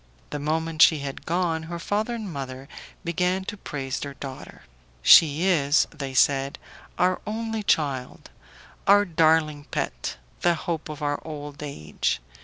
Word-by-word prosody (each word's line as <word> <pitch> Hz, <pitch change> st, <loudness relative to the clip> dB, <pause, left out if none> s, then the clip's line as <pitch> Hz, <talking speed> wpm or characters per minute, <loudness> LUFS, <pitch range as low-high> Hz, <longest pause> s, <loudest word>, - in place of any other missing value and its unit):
The 145 Hz, -, -3 dB
moment 160 Hz, +2 st, -1 dB
she 160 Hz, -, +8 dB
had 140 Hz, -1 st, -6 dB
gone 170 Hz, -1 st, 0 dB
her 170 Hz, -, -4 dB
father 210 Hz, +7 st, -1 dB
and 210 Hz, -6 st, -6 dB
mother 135 Hz, -1 st, -6 dB, 0.4 s
began 180 Hz, +2 st, 0 dB
to 210 Hz, -, -4 dB
praise 135 Hz, -9 st, -4 dB
their 140 Hz, -1 st, -6 dB
daughter. 135 Hz, -1 st, -9 dB, 0.4 s
"She 155 Hz, -, +7 dB
is," 150 Hz, -5 st, +3 dB
they 140 Hz, -4 st, -6 dB
said, 135 Hz, +1 st, +3 dB, 0.4 s
"our 180 Hz, +1 st, +2 dB
only 225 Hz, 0 st, -3 dB
child, 140 Hz, -9 st, -1 dB, 0.6 s
our 205 Hz, 0 st, +6 dB
darling 160 Hz, -3 st, +2 dB
pet, -, -, -3 dB, 0.2 s
the 175 Hz, -1 st, +3 dB
hope 160 Hz, -1 st, -4 dB
of 150 Hz, 0 st, -7 dB
our 145 Hz, 0 st, -1 dB
old 145 Hz, -2 st, -8 dB
age. 75 Hz, -, -2 dB
155 Hz, 145 wpm, -25 LUFS, 140-180 Hz, 0.6 s, she